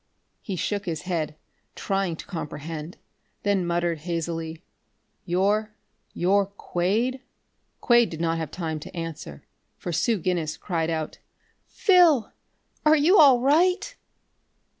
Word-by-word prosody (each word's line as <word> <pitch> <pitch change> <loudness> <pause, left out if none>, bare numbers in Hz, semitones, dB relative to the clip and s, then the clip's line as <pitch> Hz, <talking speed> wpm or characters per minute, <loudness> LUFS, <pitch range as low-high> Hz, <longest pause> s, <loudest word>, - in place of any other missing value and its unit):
He 195 - -4
shook 205 +2 -2
his 160 -2 -3
head, 165 -5 -2 0.4
trying 195 -3 -1
to - - -10
comprehend, 160 -1 -6 0.5
then 200 -3 +1
muttered 170 -1 0
hazily: 165 0 -4 0.6
"You 200 +4 +1 0.5
you're 195 +2 +2
Quade?" 200 +6 -1 0.6
Quade 240 -3 +4
did 160 - -7
not 165 0 0
have 160 -3 -4
time 160 -3 -4
to 150 - -10
answer, 160 - -6 0.3
for 175 - -5
Sue 190 +8 +1
Guinness 170 -4 -2
cried 165 -4 -2
out: 160 -2 -3 0.5
"Phil! 345 - +4 0.5
Are 305 0 +6
you 330 +7 +5
all 270 -5 +7
right?" 355 - +2
180 Hz, 120 wpm, -25 LUFS, 165-220 Hz, 0.6 s, all